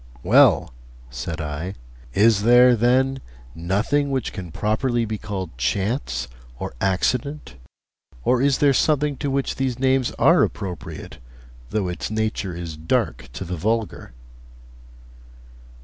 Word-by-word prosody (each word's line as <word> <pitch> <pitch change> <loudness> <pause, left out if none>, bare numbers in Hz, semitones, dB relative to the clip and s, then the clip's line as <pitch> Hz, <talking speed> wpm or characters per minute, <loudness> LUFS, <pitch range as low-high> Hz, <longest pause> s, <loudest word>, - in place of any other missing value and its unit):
'Well,' - - +5 0.4
said 65 +7 -5
I, 80 +5 -4 0.4
'is 110 -1 +4
there, 120 +2 +6
then, 130 +3 +2 0.3
nothing 105 - 0
which 130 -4 -2
can 90 -4 -7
properly 115 +5 0
be 110 -1 -4
called 95 - -5
chance 65 - -1 0.3
or - - -5
accident, 120 - -1 0.7
or 125 0 +2
is 140 -1 +3
there 145 -1 +4
something 150 +1 +2
to 145 - -2
which 135 0 -1
these 130 -2 -1
names 130 -1 +2
are - - +5
appropriate, 90 -4 -4 0.5
though 105 -4 -1
its 90 - -4
nature 110 -4 -2
is 85 -2 -6
dark 75 -5 -1
to 95 - -6
the 90 +1 -4
vulgar?' 110 - -2
110 Hz, 125 wpm, -22 LUFS, 90-130 Hz, 0.7 s, there